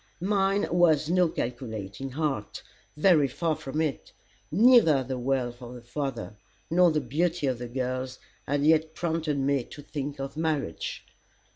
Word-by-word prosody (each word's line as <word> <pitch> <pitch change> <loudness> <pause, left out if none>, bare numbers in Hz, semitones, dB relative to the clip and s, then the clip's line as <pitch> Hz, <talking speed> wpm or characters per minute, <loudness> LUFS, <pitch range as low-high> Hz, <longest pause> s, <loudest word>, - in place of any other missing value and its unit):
Mine 195 +1 +1
was 165 -3 +3
no 180 -1 +4
calculating 120 -2 -5
heart. 135 -7 -3 0.3
Very 155 -3 +5
far 160 +4 -1
from 145 +2 -5
it. 155 -3 -2 0.4
Neither 195 - +6
the 130 0 -4
wealth 125 -1 -1
of 125 0 -8
the 120 - -11
father, 125 -4 -4 0.3
nor 180 +1 +5
the 155 -1 +1
beauty 160 +5 -1
of 130 -3 0
the 120 - -5
girls, 130 +1 -3 0.3
had 145 +1 0
yet 160 0 +3
prompted 160 -3 -1
me 140 -1 +1
to 145 - -11
think 145 -1 -5
of 135 +1 -5
marriage. 155 - -2
145 Hz, 150 wpm, -27 LUFS, 130-160 Hz, 0.4 s, Neither